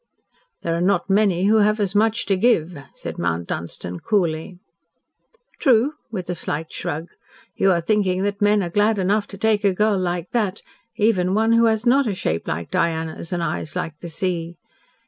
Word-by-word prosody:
"There 165 0 0
are 170 - -1
not 185 +1 +1
many 195 -3 +3
who 215 +2 +4
have 215 +1 +3
as 200 -2 0
much 220 +2 +2
to 195 - +2
give," 185 -5 +2 0.2
said - - -7
Mount 85 0 -1
Dunstan 90 +1 -5
coolly. 175 -3 -1 1.0
"True," 260 0 +3 0.2
with 185 -5 -4
a 180 - -2
slight 155 -1 -4
shrug. 160 +4 -4 0.5
"You 195 - +3
are 170 -2 +2
thinking 190 0 +1
that 200 0 -2
men 205 0 +3
are 175 - -4
glad 210 +3 +2
enough 200 +2 +1
to 200 - -9
take 215 +1 +1
a 195 -2 +2
girl 210 0 +2
like 175 -1 -2
that 210 -5 -1 0.3
even 200 -4 +2
one 225 +1 +2
who 230 0 +5
has 220 0 +1
not 265 +2 +4
a 200 - -1
shape 80 - -2
like 85 +2 -4
Diana's 160 0 -1
and 175 -1 -1
eyes 155 0 -3
like 165 -4 -4
the 170 - -7
sea. 170 0 -3
190 Hz, 185 wpm, -22 LUFS, 170-210 Hz, 1.0 s, who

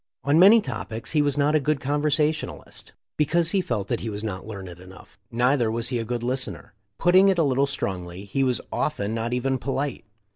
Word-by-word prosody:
On 145 +3 +3
many 210 +5 +8
topics 115 - -5
he 150 - +3
was 145 -1 0
not 145 +1 +2
a 155 - +4
good 150 0 0
conversation 150 +2 0
alist, - - -12 0.2
because 165 +3 +2
he 195 - +2
felt 110 - -3
that - - -1
he 115 - -4
was 105 0 -5
not 100 -2 -5
learned 95 -5 -8
enough. 95 +2 -15
Neither 120 0 +2
was 115 +1 -2
he 125 -2 -1
a - - -2
good 120 +1 -3
listener. 125 - -3 0.2
Putting 185 +3 +5
it 190 - +2
a 165 - +3
little 140 -1 +2
strongly, 95 -6 -4
he 135 +7 -1
was 125 -2 +1
often 110 -9 -2
not 115 +1 -2
even 130 +1 0
polite. 135 +1 -3
130 Hz, 210 wpm, -24 LUFS, 110-150 Hz, 0.2 s, many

